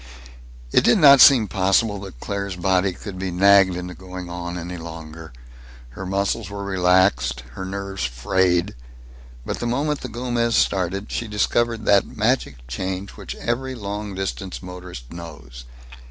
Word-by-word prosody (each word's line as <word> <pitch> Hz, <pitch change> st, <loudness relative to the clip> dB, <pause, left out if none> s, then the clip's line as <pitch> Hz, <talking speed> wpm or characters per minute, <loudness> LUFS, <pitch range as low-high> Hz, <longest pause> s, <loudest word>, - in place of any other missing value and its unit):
It -, -, +4 dB
did -, -, +5 dB
not 140 Hz, -6 st, +8 dB
seem 120 Hz, -6 st, +8 dB
possible 100 Hz, +3 st, +1 dB
that 95 Hz, -10 st, -10 dB
Claire's 100 Hz, +2 st, -4 dB
body 95 Hz, +1 st, +1 dB
could 95 Hz, +1 st, -8 dB
be 95 Hz, 0 st, -2 dB
nagged 95 Hz, +1 st, +5 dB
into 90 Hz, 0 st, -5 dB
going 90 Hz, -1 st, -8 dB
on 90 Hz, 0 st, -5 dB
any 90 Hz, +1 st, -6 dB
longer. 80 Hz, -1 st, -9 dB, 0.6 s
Her 90 Hz, +10 st, -8 dB
muscles 100 Hz, +2 st, -1 dB
were 100 Hz, 0 st, -6 dB
relaxed, 90 Hz, -9 st, +2 dB
her 95 Hz, +10 st, -6 dB
nerves 100 Hz, -1 st, -5 dB
frayed. 85 Hz, +9 st, +1 dB, 0.7 s
But -, -, -4 dB
the 120 Hz, -, -2 dB
moment 145 Hz, +5 st, -1 dB
the 125 Hz, -, -5 dB
Gomez 120 Hz, -1 st, -1 dB
started, 95 Hz, +2 st, 0 dB
she 120 Hz, -, -3 dB
discovered 115 Hz, +1 st, 0 dB
that 100 Hz, -1 st, +4 dB
magic 105 Hz, -, 0 dB
change 95 Hz, +9 st, -4 dB
which -, -, -8 dB
every 130 Hz, +3 st, -3 dB
long 105 Hz, -2 st, -5 dB
distance 95 Hz, 0 st, -4 dB
motorist 90 Hz, -8 st, -9 dB
knows. 75 Hz, -8 st, -10 dB
95 Hz, 150 wpm, -22 LUFS, 90-105 Hz, 0.7 s, not